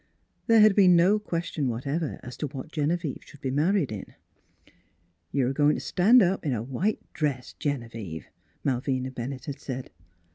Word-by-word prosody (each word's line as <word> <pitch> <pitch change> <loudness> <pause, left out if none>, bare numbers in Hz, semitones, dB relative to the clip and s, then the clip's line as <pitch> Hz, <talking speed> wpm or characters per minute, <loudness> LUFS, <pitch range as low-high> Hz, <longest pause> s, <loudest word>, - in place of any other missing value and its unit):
There 225 -1 +6
had 210 -2 +6
been 185 -3 +6
no 185 +5 +4
question 170 -7 -2
whatever 140 +7 -2
as 125 - -8
to 150 - -2
what 140 +3 -8
Genevieve 155 0 -1
should 145 - -16
be 130 - -2
married 155 - +2
in. 105 -3 -7 0.6
" 85 -1 -40
You're 130 -3 +1
a - - -1
goin' 145 +1 +3
t' - - -3
stan' 220 +6 +5
up 190 +2 0
in 145 -5 0
a 110 -2 -2
white 155 - -1 0.2
dress, 140 -5 -2
Genevieve," 115 - -4 0.4
Malvina 130 0 -1
Bennett 130 +1 -6
had 140 -3 -6
said. 130 -2 -6
140 Hz, 175 wpm, -27 LUFS, 125-170 Hz, 0.6 s, There